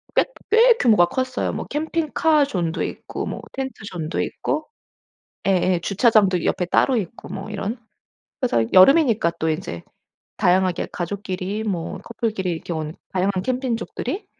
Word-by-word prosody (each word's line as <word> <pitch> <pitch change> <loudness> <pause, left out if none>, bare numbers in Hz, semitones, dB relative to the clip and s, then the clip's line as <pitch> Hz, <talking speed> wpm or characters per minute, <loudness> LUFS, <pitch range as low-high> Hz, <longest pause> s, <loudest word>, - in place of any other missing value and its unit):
꽤 - - +5 0.3
꽤 465 +2 +7
규모가 215 - +5
컸어요. 255 +7 -2
뭐 - - -4
캠핑카 310 0 +1
존도 175 -10 -2
있고 - - -5
뭐 - - -5
텐트존도 195 -11 -4
있고 305 +1 -2 0.8
예예. 185 -2 +3
주차장도 200 -4 +3
옆에 180 - +1
따로 250 +8 +2
있고 205 0 -5
뭐 195 +2 -6
이런. 210 +3 -3 0.6
그래서 240 - +2
여름이니까 225 - +6
또 160 - 0
인제 155 - -4 0.5
다양하게 185 0 +2
가족끼리 190 +2 -3
뭐 180 -6 -3
커플끼리 220 -5 -2
이렇게 170 0 -4
온 155 0 -4 0.2
다양한 190 0 +1
캠핑족들이 255 - -3
200 Hz, 310 characters per minute, -22 LUFS, 180-255 Hz, 0.8 s, 꽤